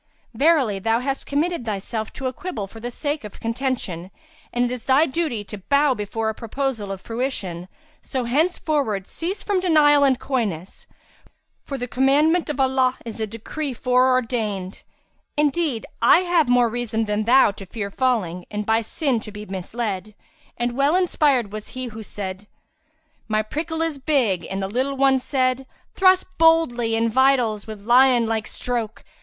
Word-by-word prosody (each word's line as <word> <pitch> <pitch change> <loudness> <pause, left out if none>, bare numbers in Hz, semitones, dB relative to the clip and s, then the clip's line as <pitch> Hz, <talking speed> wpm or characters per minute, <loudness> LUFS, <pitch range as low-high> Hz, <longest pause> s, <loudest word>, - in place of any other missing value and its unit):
Verily, 270 -6 +3
thou 225 +3 +1
hast 270 +2 -3
committed 320 +1 0
thyself 215 +1 -4
to 265 - -7
a 255 - -1
quibble 255 - -5
for 225 +3 -12
the 240 +2 -5
sake 290 +3 -3
of 210 - -10
contention, 230 -7 -3 0.4
and 245 0 +1
it 245 - -2
is 250 -2 -6
thy 270 +4 +5
duty 285 -8 -2
to 205 0 -9
bow 280 +7 +3
before 220 0 -3
a 220 - 0
proposal 230 -2 -3
of 195 - -5
fruition, 205 -7 -4 0.3
so 260 -3 -3
henceforward 280 - 0
cease 370 - -4
from 405 -3 +1
denial 300 -5 +5
and 265 -2 +3
coyness, 205 - -3 0.8
for 275 - -5
the 245 -1 -4
commandment 295 +7 +3
of 295 - -3
Allah 260 -1 +2
is 225 -1 -6
a 220 - -1
decree 250 +6 -5
foreordained:[FN#337] 245 -6 0 0.6
indeed, 295 -5 +1 0.2
I 240 +9 +6
have 345 -6 +2
more 245 -1 +5
reason 225 -1 -2
than 210 0 -1
thou 255 -1 +6
to 195 -1 -11
fear 200 -1 -5
falling 195 -9 0
and 210 0 -4
by 225 +1 +2
sin 255 +2 -1
to 215 - -9
be 210 0 -8
misled; 200 +1 -4 0.4
and 240 0 -1
well 280 +5 +3
inspired 290 - +2
was 215 0 -7
he 255 - -3
who 225 -2 -7
said, 200 -1 -7 0.8
'My 215 -1 +1
prickle 320 +7 -3
is 320 -4 -2
big 260 - +1
and 195 0 -3
the - - -1
little 260 +6 -1
one 270 -1 +4
said, 255 -1 0
* - - -38
'Thrust 375 -1 +4
boldly 285 -9 +4
in 225 +1 +2
vitals 240 -4 +2
with 210 -2 -9
lion 245 0 +5
like 220 -1 -2
stroke! 235 -3 -4
245 Hz, 170 wpm, -22 LUFS, 215-280 Hz, 0.8 s, I